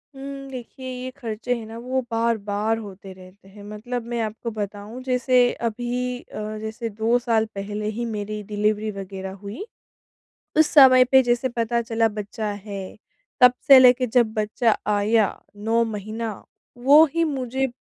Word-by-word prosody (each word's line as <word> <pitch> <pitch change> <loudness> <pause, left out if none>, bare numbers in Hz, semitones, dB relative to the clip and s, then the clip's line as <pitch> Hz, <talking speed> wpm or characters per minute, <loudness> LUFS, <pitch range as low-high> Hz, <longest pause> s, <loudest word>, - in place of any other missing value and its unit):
उम, 275 0 -8
देखिए, 255 +1 -8
ये 255 - -4
खर्चे 235 0 -3
हैं 225 -2 -7
ना 225 +1 -9
वो 255 +2 -2
बार-बार 225 -1 0
होते 195 -3 -10
रहते 185 +1 -17
हैं 200 +1 -14
मतलब 225 +4 -5
मैं 235 - -1
आपको 225 +2 -4
बताऊँ 210 +3 -6
जैसे 250 -1 +3 0.2
अभी 245 +2 -3
अ, 215 -2 -7
जैसे 225 +2 -5
2 220 +3 +1
साल 230 -2 +1
पहले 205 +2 -4
ही 235 - -2
मेरी 215 -1 -4
डिलीवरी 210 +1 -1
वगैरह 190 -1 -7
हुई। 215 - -6 0.9
उस 315 - +6
समय 255 -3 +8
पे 265 +1 +5
जैसे 245 +1 +1
पता 235 -1 -1
चला 225 0 +1
बच्चा 210 +1 -5
है, 200 -1 -8 0.4
तब 250 0 +8
से 275 -1 +10
लेकर 255 0 +6
जब 235 -3 +3
बच्चा 215 +1 +1
आया, 210 +1 +3 0.3
9 225 +3 +1
महीना 220 +1 -4 0.4
वो 280 +6 +7
ही 335 0 +2
मुझे 265 -3 -1
225 Hz, 155 wpm, -23 LUFS, 210-250 Hz, 0.9 s, से